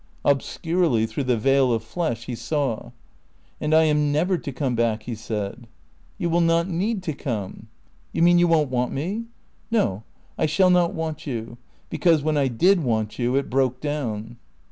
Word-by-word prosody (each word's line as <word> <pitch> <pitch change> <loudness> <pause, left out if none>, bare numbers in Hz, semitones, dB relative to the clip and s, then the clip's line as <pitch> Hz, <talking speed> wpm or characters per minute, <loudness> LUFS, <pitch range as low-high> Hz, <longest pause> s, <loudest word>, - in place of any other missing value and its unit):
Obscurely, 145 -2 +1
through 115 +5 -4
the 125 -2 +2
veil 135 +2 +3
of 115 -1 0
flesh, 120 -3 -3
he 125 - -5
saw. 120 0 -2 0.7
"And 150 - -2
I 160 +1 +6
am 150 -1 +2
never 175 +6 +2
to 145 - -5
come 130 -1 -2
back?" 115 -2 0
he 120 - -5
said. 110 +1 -5 0.5
"You 175 - -1
will 170 +1 +2
not 165 +1 +2
need 190 +3 -1
to 160 - -2
come." 110 -9 -5 0.4
"You - - +1
mean 175 0 +6
you 175 - +4
won't 155 -5 +2
want 125 -1 0
me?" 195 +11 -3 0.4
"No. 200 - +1 0.4
I 155 - +2
shall 185 +4 +3
not 175 -1 +3
want 160 -1 -4
you. 120 -2 -5 0.3
Because, 165 -5 +3
when 155 0 +1
I 140 -2 +2
did 170 +9 +3
want 110 -3 -1
you 125 +1 +1
it 140 - +1
broke 130 -1 +1
down." 120 -7 -4
140 Hz, 180 wpm, -24 LUFS, 120-165 Hz, 0.7 s, I